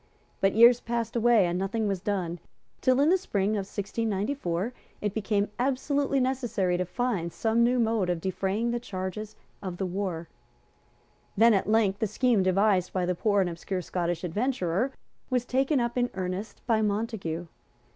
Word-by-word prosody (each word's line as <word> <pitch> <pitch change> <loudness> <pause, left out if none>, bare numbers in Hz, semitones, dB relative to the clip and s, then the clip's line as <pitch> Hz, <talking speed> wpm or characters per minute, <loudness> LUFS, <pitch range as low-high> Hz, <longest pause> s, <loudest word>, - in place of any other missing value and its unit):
But 195 0 +2
years 235 +2 +7
passed 235 -1 -3
away; 235 -3 +4
and 175 +1 -1
nothing 210 +3 -1
was 195 -3 -1
done, 180 -5 -2 0.4
till, 255 0 +3
in 295 - +4
the 375 +2 +4
spring 205 - 0
of 200 -2 -2
1694, 205 0 -2 0.3
it 210 -2 -2
became 205 -1 0
absolutely 275 +2 +1
necessary 245 -8 0
to 180 - -1
find 195 -4 -2
some 225 +4 +1
new 245 +2 +3
mode 225 -5 +1
of 175 -2 0
defraying 195 +5 -1
the 240 - -1
charges 205 0 -5 0.3
of 185 -3 -5
the 190 - -1
war. 180 -3 -3 1.1
Then 230 +2 +6
at 195 0 +1
length 210 -3 +2
the 220 - +1
scheme 230 0 +2
devised 185 0 +2
by 185 -1 0
the 180 - +1
poor 205 +2 +2
and 180 - +1
obscure 180 +2 -4
Scottish 175 0 -2
adventurer 205 +3 0 0.4
was 250 -2 0
taken 270 +3 +1
up 240 0 -1
in 245 0 +1
earnest 185 +3 -4
by 225 -2 +2
Montague. 205 -6 -2
210 Hz, 165 wpm, -27 LUFS, 185-235 Hz, 1.1 s, years